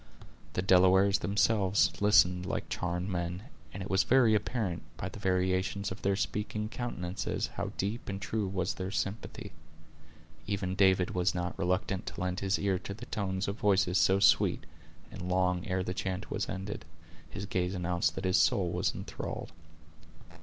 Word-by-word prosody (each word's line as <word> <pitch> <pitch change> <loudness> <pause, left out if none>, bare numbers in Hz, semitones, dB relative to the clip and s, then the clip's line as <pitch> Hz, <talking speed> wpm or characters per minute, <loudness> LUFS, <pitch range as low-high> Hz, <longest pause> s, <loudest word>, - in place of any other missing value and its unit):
The 90 - -1
Delawares 95 +1 +5
themselves 100 +1 +2
listened 90 -3 +4
like - - -3
charmed 90 +1 -2
men; 90 0 -3 0.3
and 95 - -6
it 95 - -7
was 95 0 +4
very 125 -2 +5
apparent, 105 -4 -1 0.2
by - - -4
the - - -10
variations 95 +1 0
of 95 - -7
their 100 0 +2
speaking 105 +2 -2
countenances, 95 -7 -3
how - - -3
deep 105 +5 -3
and 100 0 -3
true 105 +1 -2
was 95 -1 -1
their 95 0 -4
sympathy. 100 +2 -4 1.0
Even 95 -2 -1
David 95 -2 +3
was 90 0 +1
not 90 0 -2
reluctant 90 +1 -1
to - - -6
lend 90 0 -1
his 100 +1 +1
ears 95 -2 0
to 100 - -5
the 110 - -9
tones 95 -2 -2
of 100 +2 -3
voices 95 -3 +3
so 95 +1 +4
sweet; 100 - +4 0.5
and 90 - -6
long 90 -1 +1
ere 95 -1 0
the 90 - -3
chant 95 0 -4
was - - -2
ended, 95 -1 -5 0.5
his 95 - -6
gaze 90 0 -1
announced 85 -3 0
that - - -4
his 95 0 +3
soul 90 -3 +3
was - - 0
enthralled. - - -6
95 Hz, 165 wpm, -31 LUFS, 90-100 Hz, 1.0 s, Delawares